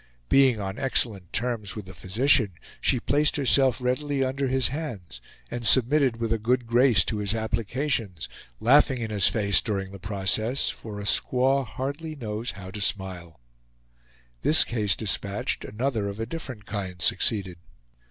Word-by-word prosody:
Being 130 -5 +4
on 95 +3 -5
excellent 110 -9 0
terms 115 -4 -2
with 105 -3 -7
the 95 - -11
physician, 105 - +2 0.3
she 125 - +2
placed 145 +5 +1
herself 135 -4 +3
readily 135 +2 -1
under 135 +1 -2
his 130 -1 +1
hands, 115 - -7 0.3
and 120 0 -5
submitted 130 +1 +4
with 115 -1 -1
a 115 - -2
good 120 +3 0
grace 115 -5 +4
to 105 - -2
his 105 +1 0
applications, 110 - -2 0.3
laughing 130 +2 +4
in 115 -2 -4
his 100 -3 +4
face 100 -3 +2
during 95 -3 -3
the 100 - -10
whole 95 +2 -8
process, 110 +6 0
for 105 -2 -9
a - - -6
squaw 130 +5 +2
hardly 145 +4 -5
knows 115 -2 -5
how 95 -1 -10
to 105 +1 -6
smile. 90 - -3 1.0
This 155 - +7
case 105 -6 0
dispatched, 100 -1 -3
another 115 -1 -2
of 100 +1 -6
a 115 - -2
different 130 -6 -8
kind 95 -4 -5
succeeded. 90 0 0
115 Hz, 160 wpm, -25 LUFS, 100-130 Hz, 1.0 s, This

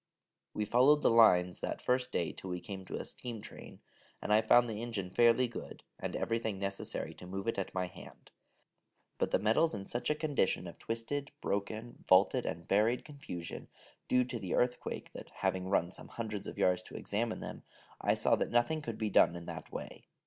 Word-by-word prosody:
We 105 - 0
followed 130 +7 +5
the - - +5
lines 90 -6 +5
that - - -3
first 125 0 0
day 85 - 0
till 95 - -8
we 90 0 -2
came 95 0 -7
to - - -5
a - - -4
steam 120 -3 -5
train, 110 +1 -11 0.4
and 105 - 0
I 110 - +6
found 120 +2 +5
the 110 -1 -4
engine 105 -6 -4
fairly 120 +3 +5
good, 120 - -8 0.2
and - - -3
everything 115 -3 -1
necessary 100 0 -3
to 90 - -11
move 95 +3 -5
it 115 - 0
at 95 - -4
my 90 -1 +1
hand: 90 - -13 0.9
but - - +1
the - - +3
metals 115 +10 +3
in 100 -1 -6
such 120 - -2
a 150 - +2
condition 145 - 0
of 85 - -9
twisted, 125 +6 -3
broken, 110 +4 -3
vaulted, 95 +1 +5
and 85 +1 -4
buried 110 +5 +2
confusion, 140 - -7 0.4
due 125 0 +4
to 125 -1 -5
the 95 -4 -2
earthquake, 125 0 -1
that, - - -9
having 95 0 -1
run 90 -2 +1
some - - -7
hundreds 105 -3 -5
of - - -7
yards 90 -1 +3
to - - -13
examine 110 +2 -2
them, - - -7 0.4
I - - +3
saw - - +3
that - - -1
nothing 120 +7 +2
could 115 -6 -5
be 110 -2 -1
done 85 - +5
in 85 -1 -7
that - - -7
way. - - -7
110 Hz, 200 wpm, -33 LUFS, 95-120 Hz, 0.9 s, I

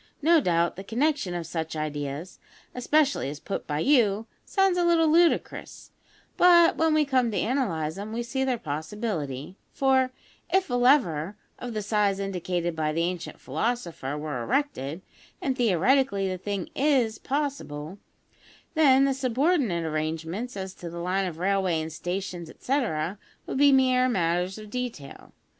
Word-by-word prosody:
No 330 +1 +6
doubt, 170 -4 +1
the 195 - -6
connection 235 - 0
of 170 -1 -4
such 160 -1 -4
ideas, 150 +2 -4 0.3
especially 285 - +1
as 145 +1 -7
put 195 - -5
by 150 0 -1
you, 225 - +3 0.2
sounds 385 -2 +2
a - - +2
little 335 -2 +4
ludicrous; 335 +2 +1 0.5
but 345 -1 +6
when 320 -1 +2
we 305 -1 +3
come 255 -4 +2
to 210 - -3
analyse 170 - -1
them, 205 +2 -6
we 235 +2 -2
see 265 +3 -2
their 260 -2 0
possibility, 160 - -4
for, 265 -1 +2 0.4
if 380 -7 +2
a - - -1
lever 215 - +3 0.2
of 245 -2 -6
the 215 - -2
size 205 -2 +1
indicated 180 -3 -2
by 155 -1 0
the 165 +2 0
ancient 175 0 -4
philosopher 160 - -3
were 150 -4 -4
erected 190 - -2 0.4
(and 265 -2 -1
theoretically, 235 - +2
the 185 -1 -3
thing 200 -1 -4
is 260 -6 +2
possible), 205 - -3 0.7
then 275 -4 +5
the 275 - +2
subordinate 260 - +1
arrangements 160 +9 -3
as 190 -1 -5
to 175 - -9
a 170 +1 -7
line 185 +2 -1
of 165 -3 -6
railway 185 -2 +1
and 160 0 -5
stations, 175 -1 -4
etcetera, 195 - -2 0.3
would - - -3
be 285 0 +6
mere 255 -1 +4
matters 180 -2 0
of 215 -1 -10
detail. 240 - -6
200 Hz, 155 wpm, -26 LUFS, 165-265 Hz, 0.7 s, No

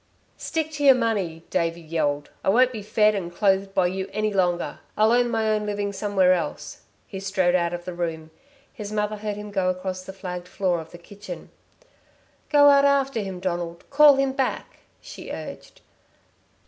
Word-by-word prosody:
"Stick 315 -1 -2
to 290 -2 -4
your 270 -2 +8
money!" 200 -9 -1
Davey 165 0 0
yelled. 155 -3 -2
"I - - +1
won't 250 +5 +4
be 220 -4 -6
fed 215 +1 +3
and 180 -4 -4
clothed 195 +1 +1
by 185 - +3
you 190 +2 -2
any 215 0 -1
longer. 175 -2 0 0.2
I'll 215 +1 +4
earn 245 0 +3
my 225 -2 0
own 210 -1 -1
living 205 -1 -2
somewhere 195 -2 +3
else." 175 - -4 0.2
He 190 - -7
strode 190 -2 +1
out 170 -2 +1
of 175 0 -6
the 180 - -5
room. 165 -2 -4 0.4
His 210 -5 -7
mother 210 0 -1
heard 210 -1 -4
him 210 0 -8
go 190 -2 +1
across 185 0 -4
the 190 - -8
flagged 180 -2 -7
floor 180 -3 -1
of 160 - -12
the - - -11
kitchen. 185 0 -10 1.0
"Go 290 -1 +6
out 280 0 +6
after 275 -3 +2
him, 195 -3 -5
Donald. 175 -2 -4
Call 290 0 +7
him 270 0 +1
back," 265 -1 -3 0.2
she - - -10
urged. - - -8
195 Hz, 185 wpm, -24 LUFS, 175-220 Hz, 1.0 s, your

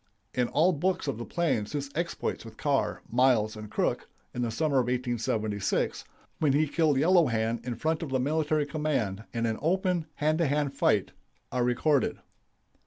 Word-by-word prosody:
In 125 -1 +1
all 160 +8 +3
books 180 +1 -1
of 135 -5 -2
the 120 - -4
plains 135 -12 -1
his 140 -1 -3
exploits 170 +1 -2
with 115 -1 -12
Carr, 140 -2 0
Miles, 120 -3 +3
and 105 -1 -8
Crook, - - -1 0.2
in 125 - -3
the 120 - 0
summer 140 +5 0
of 125 - +3
1876, 110 -5 -1 0.3
when 150 -4 +3
he 155 +2 +3
killed 155 -1 +2
Yellow 170 +3 +5
Hand 115 0 0
in 120 -1 -3
front 160 +6 -1
of 165 - -4
the 130 -1 0
military 150 +2 +1
command 140 -9 -2
in 115 0 -1
an 110 -1 -1
open 180 0 +1
hand 155 +2 +1
to 165 - +3
hand 145 0 0
fight, - - +2 0.4
are 125 0 +1
recorded. 130 +4 +2
135 Hz, 175 wpm, -28 LUFS, 115-155 Hz, 0.4 s, Yellow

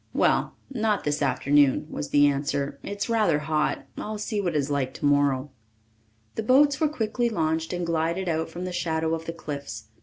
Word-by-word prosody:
"Well, - - +2 0.2
not 220 -5 0
this 150 0 -1
afternoon," 140 0 +3
was 150 - -5
the 145 0 +5
answer. 140 0 0
"It's 200 0 -4
rather 215 -9 +3
hot. 150 +1 -1
I'll 215 0 -4
see 210 0 -2
what 175 -4 -1
it - - +4
is 145 0 -1
like 135 -2 -1
tomorrow." 145 -1 +2 0.8
The - - -2
boats 270 +5 +4
were 310 - +4
quickly 240 -3 -1
launched 160 -5 -1
and 175 -1 -2
glided 170 +3 -1
out 160 -1 -1
from 180 +1 -6
the 180 - -4
shadow 160 -2 0
of 165 0 -4
the 165 - -3
cliffs. 140 -9 -7
160 Hz, 185 wpm, -26 LUFS, 145-205 Hz, 0.8 s, the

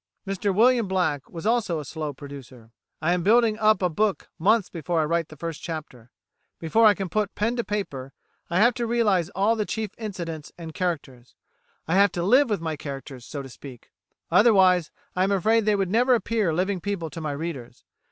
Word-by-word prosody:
Mr 195 +1 -1
William 230 +2 +4
Black 160 -8 -1
was 165 +2 -8
also 220 -8 +1
a 150 - -7
slow 155 +1 -4
producer: 130 -5 -12 0.3
"I 170 +3 +3
am 180 - 0
building 220 +3 +3
up 215 -3 +3
a - - +4
book 205 +4 -1
months 205 +3 +3
before 165 0 -2
I 155 - +2
write 165 +1 0
the 155 - -13
first 165 +1 -5
chapter; 150 -8 -7 0.5
before 220 +8 +3
I 205 - +5
can 195 -1 -4
put 210 +3 -2
pen 225 +3 0
to 235 - 0
paper 145 -12 -4 0.4
I 170 - 0
have 240 +4 +5
to 240 -1 -3
realise 210 -8 +2
all 205 +4 +2
the 215 - 0
chief 215 -1 -4
incidents 170 -8 -6
and 165 -2 -8
characters. 145 -8 -4 0.5
I 165 - 0
have 200 0 +5
to 175 - -2
live 255 +8 +4
with 205 -5 -1
my 160 -1 -2
characters, 135 -3 -8
so 140 -2 -6
to 135 - -10
speak; 125 -1 -12 0.4
otherwise, 190 -6 +5 0.3
I 185 - +2
am 195 - +1
afraid 215 +3 +2
they 210 -1 +3
would 195 -2 -1
never 245 +3 +4
appear 220 -4 0
living 185 +3 -1
people 180 -5 -3
to 165 - -7
my 150 -2 -3
readers. 140 -6 -6
180 Hz, 200 wpm, -25 LUFS, 155-210 Hz, 0.5 s, I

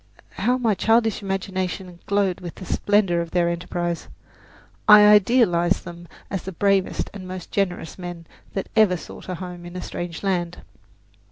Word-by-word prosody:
How 250 +3 +1
my 230 -4 +2
childish 225 +2 +2
imagination 190 -2 -3
glowed 200 -3 +1
with 175 -2 -7
the 185 - -9
splendour 195 -3 +2
of 170 - -5
their 175 0 +1
enterprise! 175 0 -3 0.8
I 210 -1 +10
idealized 205 -4 +4
them 175 -1 -9 0.2
as 195 - -2
the 190 - -6
bravest 195 +1 +1
and 190 -2 -8
most 185 -1 -7
generous 185 -3 -2
men 175 -2 -7 0.3
that 195 - -3
ever 210 -5 +5
sought 170 - -11
a 180 - -2
home 180 -1 -8
in 175 +1 -10
a 180 - -4
strange 175 +1 -6
land. 175 -3 -1
185 Hz, 160 wpm, -23 LUFS, 175-200 Hz, 0.8 s, I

